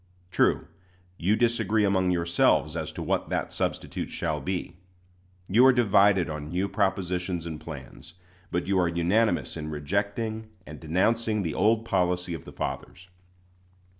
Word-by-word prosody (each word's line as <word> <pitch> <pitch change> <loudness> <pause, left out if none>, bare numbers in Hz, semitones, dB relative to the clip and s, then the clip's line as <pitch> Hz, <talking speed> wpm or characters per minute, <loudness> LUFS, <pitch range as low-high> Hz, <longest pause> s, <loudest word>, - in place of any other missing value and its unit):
True, - - +2 0.5
you 95 +5 +2
disagree 110 -2 +2
among 95 -2 +2
yourselves 85 -1 +2
as - - -3
to - - -5
what - - -1
that - - -2
substitute - - -3
shall 75 -1 -2
be. 90 -1 -4 0.7
You 115 +6 +5
are - - +8
divided 100 -6 +4
on 75 -1 -5
new 90 +4 -1
propositions 95 -3 -1
and 80 -2 -6
plans, 80 +1 -10 0.3
but 90 - -1
you 95 0 +1
are 90 - +3
unanimous 90 +7 +1
in 75 -1 -5
rejecting 100 +8 -2 0.2
and 75 0 -10
denouncing 105 +6 +1
the 80 -4 -2
old 110 +3 +2
policy 90 -3 0
of 80 - -7
the - - -10
fathers. 95 +1 -6
95 Hz, 145 wpm, -27 LUFS, 85-105 Hz, 0.7 s, are